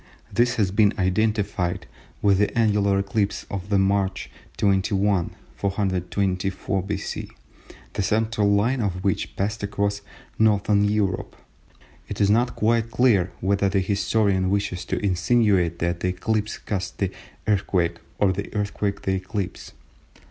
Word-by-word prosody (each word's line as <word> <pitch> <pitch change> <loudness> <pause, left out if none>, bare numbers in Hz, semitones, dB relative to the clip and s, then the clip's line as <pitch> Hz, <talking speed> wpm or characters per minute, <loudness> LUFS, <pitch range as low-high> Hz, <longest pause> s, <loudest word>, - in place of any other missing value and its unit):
This 120 +3 +2
has 100 -4 +1
been 105 +1 +3
identified 95 -2 0 0.4
with 100 -2 +4
the 105 +3 +1
annular 105 -3 +3
eclipse 100 +1 -1
of 100 0 -5
March 95 0 +1 0.3
21, 95 -1 +1 0.2
424 95 0 -1
B.C., 100 +1 -4 0.6
the - - -1
central 110 +1 +1
line 115 +6 +2
of 95 -3 -2
which 95 - -1
passed 105 +3 -2
across 100 0 -1 0.4
Northern 105 -1 +3
Europe. 105 -2 -1 0.7
It - - -5
is 100 0 +4
not 120 +3 +2
quite 115 +1 +1
clear 110 -6 +3
whether 100 +1 +2
the 100 +1 +1
historian 100 -1 +1
wishes 100 -3 -1
to - - -2
insinuate 95 -3 +2
that 85 0 -1
the 90 - -1
eclipse 105 +4 -1
caused 95 -3 -4
the 95 -2 -1 0.3
earthquake 90 -4 +1 0.2
or 100 -2 +3
the 100 +2 -5
earthquake 100 -1 -2
the 95 - 0
eclipse. 95 0 -4
100 Hz, 130 wpm, -24 LUFS, 95-105 Hz, 0.7 s, with